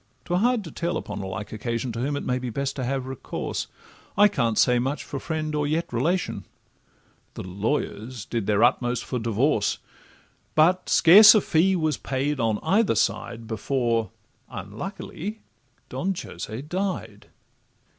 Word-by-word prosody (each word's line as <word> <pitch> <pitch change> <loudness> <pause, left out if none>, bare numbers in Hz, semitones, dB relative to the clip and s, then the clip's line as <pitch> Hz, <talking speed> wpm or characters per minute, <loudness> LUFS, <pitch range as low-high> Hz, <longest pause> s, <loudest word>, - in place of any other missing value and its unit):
('Twere 175 +1 0
hard 240 0 +2
to 165 - -9
tell 170 0 -2
upon - - -6
a 95 - -5
like 105 +2 -6
occasion 115 +2 -3
To 115 - -5
whom 140 +4 -1
it - - -4
may 125 0 0
be 125 -1 -4
best 135 +4 -3
to 130 - -2
have 130 +1 -2
recourse— 130 -1 -4 0.5
I 205 +1 +7
can't 120 - 0
say 125 -1 +4
much 135 +4 -2
for 140 - -6
friend 155 0 -3
or 150 -1 0
yet 155 -2 -1
relation): 170 +10 -1 0.9
The - - -6
lawyers 110 +4 -3
did 115 -4 -3
their 105 +1 +3
utmost 120 -1 +2
for 125 - -3
divorce, 115 0 +1 0.8
But 180 +4 +3
scarce 205 +6 +9
a - - +6
fee 185 +4 +2
was 155 -5 0
paid 140 +2 -2
on 110 -2 +1
either 210 +2 +2
side 115 -1 -1
Before, 115 0 -1 0.4
unluckily, 180 - -6 0.5
Don 190 +1 -2
Jose 110 +5 -7
died. 175 - -4
135 Hz, 155 wpm, -25 LUFS, 115-170 Hz, 0.9 s, scarce